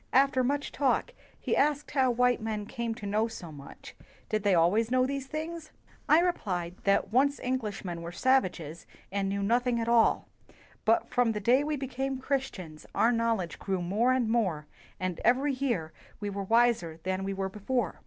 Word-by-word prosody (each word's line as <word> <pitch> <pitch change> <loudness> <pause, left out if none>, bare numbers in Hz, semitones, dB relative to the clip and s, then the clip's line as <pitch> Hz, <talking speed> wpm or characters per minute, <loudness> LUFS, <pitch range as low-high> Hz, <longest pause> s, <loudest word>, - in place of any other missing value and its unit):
" - - -38
"After 260 -2 -1
much 285 +3 -1
talk, 285 - 0 0.3
he - - -1
asked 295 0 +1
how 265 -3 +3
white 245 0 +2
men 215 -2 -3
came 230 0 -4
to 215 - -9
know 210 +3 +1
so 175 -7 -9
much 140 -2 -12 0.2
— - - -30
did 215 0 0
they 200 -2 +3
al 170 +1 +4
ways 225 +2 +1
know 255 0 +3
these 275 0 -3
things? 315 +2 -5 0.4
I 310 +3 +7
replied 185 - -1
that 200 +1 +2
once 280 +3 +3
Englishmen 210 -9 -3
were 170 +1 -6
savages 175 - 0 0.2
and 195 0 -1
knew 200 0 -1
nothing 240 +3 +1
at 230 - -2
all, 235 -1 +3 0.6
but 225 +1 +2
from 245 -2 +2
the 210 - -3
day 245 +7 +3
we 300 0 -1
became 270 0 -3
Chris 270 0 -1
tians 160 -5 -11
our 235 - +4
knowledge 230 -7 -1
grew 190 -2 -2
more 205 +8 +1
and 255 -3 +1
more, 190 -10 0 0.3
and 185 -1 -3
every 270 +4 +3
year 235 - -2 0.3
we 205 -1 -3
were 200 0 -4
wiser 225 -7 +2
than 185 +1 -2
we 195 0 -3
were 190 0 -2
before." 210 0 -2
230 Hz, 195 wpm, -29 LUFS, 195-260 Hz, 0.6 s, I